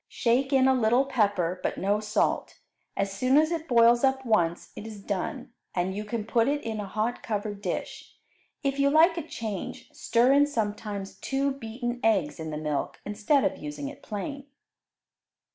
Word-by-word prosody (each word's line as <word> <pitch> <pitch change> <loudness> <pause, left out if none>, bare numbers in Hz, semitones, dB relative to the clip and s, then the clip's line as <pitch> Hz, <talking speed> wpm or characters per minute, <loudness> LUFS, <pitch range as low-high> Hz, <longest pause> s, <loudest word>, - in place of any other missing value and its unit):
Shake 255 +3 +1
in 265 -1 +5
a 265 - +5
little 245 +2 +3
pepper, 200 -9 +1
but - - -2
no 205 +2 +1
salt. 210 0 0 0.4
As 195 0 -1
soon 255 +7 +3
as 310 +2 +4
it 330 -1 -3
boils 235 0 +5
up 265 0 +2
once, 175 -7 +1
it 220 - -7
is 215 -2 -8
done, 205 +6 -4 0.2
and 185 +1 0
you 210 +1 -4
can 215 0 -3
put 230 0 +2
it 290 +1 0
in 220 -1 -3
a 205 - -4
hot 220 +5 -2
covered 205 -1 -3
dish. 185 -4 -5 0.5
If 275 0 -1
you 280 0 +4
like 325 +4 +5
a 335 - -2
change, 220 - -6
stir 240 +3 +3
in 285 +1 +5
sometimes 210 -5 -4
two 275 +1 0
beaten 240 -1 -4
eggs 190 -10 +2
in 160 0 -5
the 150 - -4
milk 150 -2 -3
instead 215 +7 +2
of - - 0
using 150 -2 -5
it - - -12
plain. 280 +7 -6
225 Hz, 180 wpm, -27 LUFS, 200-265 Hz, 0.5 s, in